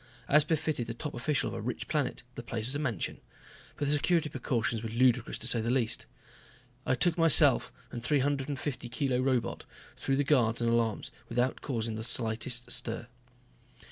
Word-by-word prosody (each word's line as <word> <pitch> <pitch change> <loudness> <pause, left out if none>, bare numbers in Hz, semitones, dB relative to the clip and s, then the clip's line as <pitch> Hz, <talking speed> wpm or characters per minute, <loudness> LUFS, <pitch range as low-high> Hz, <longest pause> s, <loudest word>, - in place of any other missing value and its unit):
As 150 +1 +5
befitted 155 -6 -1
the 115 - -5
top 150 +4 -5
official 135 +4 -1
of - - -7
a - - -4
rich 120 +2 -4
planet, 150 -5 -1
the 120 - -6
place 115 -2 -4
was 130 - -3
a 145 - -2
mansion. 120 - -3 0.6
But 145 - -1
the 145 - +2
security 155 +1 +2
precautions 120 -4 -1
were 115 - -4
ludicrous 120 +1 +2
to 115 - -1
say 120 -2 +3
the 115 - -2
least. 120 -3 0 0.8
I 130 - +3
took 170 +6 +2
myself 165 -3 +6 0.2
and 120 - -5
a - - -17
three 145 +4 +2
hundred 140 0 -1
fifty 130 -3 -4
kilo 130 0 0
robot 130 -2 0 0.3
through 135 - -1
the 145 - +2
guards 120 -6 +2
and 115 -1 +1
alarms 115 -2 0 0.2
without 125 +2 0
causing 115 -4 -2
the 110 - -4
slightest 120 +1 0
stir. 115 +1 +1
125 Hz, 190 wpm, -30 LUFS, 115-145 Hz, 0.8 s, myself